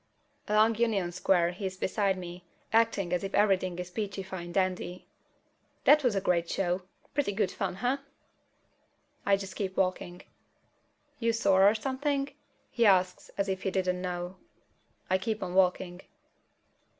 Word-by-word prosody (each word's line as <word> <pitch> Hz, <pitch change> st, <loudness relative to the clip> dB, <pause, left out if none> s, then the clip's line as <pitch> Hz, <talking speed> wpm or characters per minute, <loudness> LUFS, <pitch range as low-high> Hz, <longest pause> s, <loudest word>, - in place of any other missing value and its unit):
Along 215 Hz, +2 st, +4 dB
Union 210 Hz, -7 st, +1 dB
Square 175 Hz, -1 st, +2 dB
he's 190 Hz, 0 st, -5 dB
beside 195 Hz, 0 st, 0 dB
me, 175 Hz, 0 st, -8 dB, 0.3 s
acting 220 Hz, -6 st, +2 dB
as 180 Hz, -, 0 dB
if 195 Hz, -, -3 dB
everything 190 Hz, -3 st, +2 dB
is 180 Hz, 0 st, -6 dB
peachy 200 Hz, -1 st, -3 dB
fine 185 Hz, -2 st, -7 dB
dandy. 185 Hz, -1 st, -1 dB, 0.8 s
"That 300 Hz, 0 st, +6 dB
was 245 Hz, -5 st, +2 dB
a -, -, +2 dB
great 170 Hz, -2 st, +1 dB
show. 180 Hz, -1 st, 0 dB, 0.3 s
Pretty 290 Hz, -7 st, 0 dB
good 195 Hz, -2 st, 0 dB
fun, 185 Hz, -2 st, -3 dB
huh?" 245 Hz, +7 st, 0 dB, 1.3 s
I 200 Hz, 0 st, +5 dB
just 195 Hz, -1 st, -7 dB
keep 190 Hz, -2 st, -3 dB
walking. 185 Hz, -1 st, -1 dB, 1.0 s
"You 230 Hz, -1 st, +1 dB
sore 195 Hz, -3 st, +5 dB
or 215 Hz, -, +1 dB
something?" 275 Hz, +3 st, -1 dB, 0.4 s
he 235 Hz, -, +1 dB
asks, 185 Hz, -3 st, +3 dB
as 200 Hz, 0 st, 0 dB
if 190 Hz, -1 st, -2 dB
he -, -, 0 dB
didn't 185 Hz, -1 st, 0 dB
know. 180 Hz, 0 st, -4 dB, 0.7 s
I 185 Hz, +1 st, +2 dB
keep 220 Hz, +1 st, -2 dB
on 180 Hz, -1 st, -4 dB
walking. 180 Hz, -1 st, +1 dB
190 Hz, 150 wpm, -29 LUFS, 180-210 Hz, 1.3 s, That